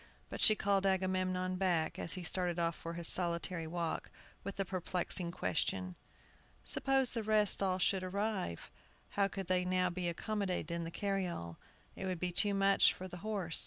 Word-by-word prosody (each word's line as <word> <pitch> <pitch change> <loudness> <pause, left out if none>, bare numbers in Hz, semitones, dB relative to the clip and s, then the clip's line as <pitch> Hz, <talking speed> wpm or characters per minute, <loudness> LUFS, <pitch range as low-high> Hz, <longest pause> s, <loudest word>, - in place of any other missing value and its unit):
But - - -4
she 215 - +7
called 195 -1 +2
Agamemnon 185 -1 0
back, 175 -4 +1
as 165 - -1
he 185 - -5
started 175 0 -1
off 170 -1 +1
for 165 - -6
his 170 -1 +1
solitary 170 -1 -1
walk, 170 0 -3 0.3
with 200 0 -6
a 195 - +1
perplexing 180 -1 -1
question: 90 - -1 0.7
"Suppose 270 -2 +3
the 230 - -2
rest 215 -2 +4
all 185 -2 +1
should 190 +1 +2
arrive, 190 - -3 0.4
how 200 -1 +2
could 195 0 -5
they 180 0 +1
now 185 0 +1
be 180 0 -2
accommodated 195 0 -2
in 170 0 -2
the - - -4
carryall? 180 - -3 0.4
It 190 - -4
would 185 -2 -2
be 180 +1 -1
too 200 +3 +3
much 195 0 +5
for 185 - -7
the 180 -1 -8
horse! 195 -4 -1
185 Hz, 175 wpm, -35 LUFS, 170-195 Hz, 0.7 s, she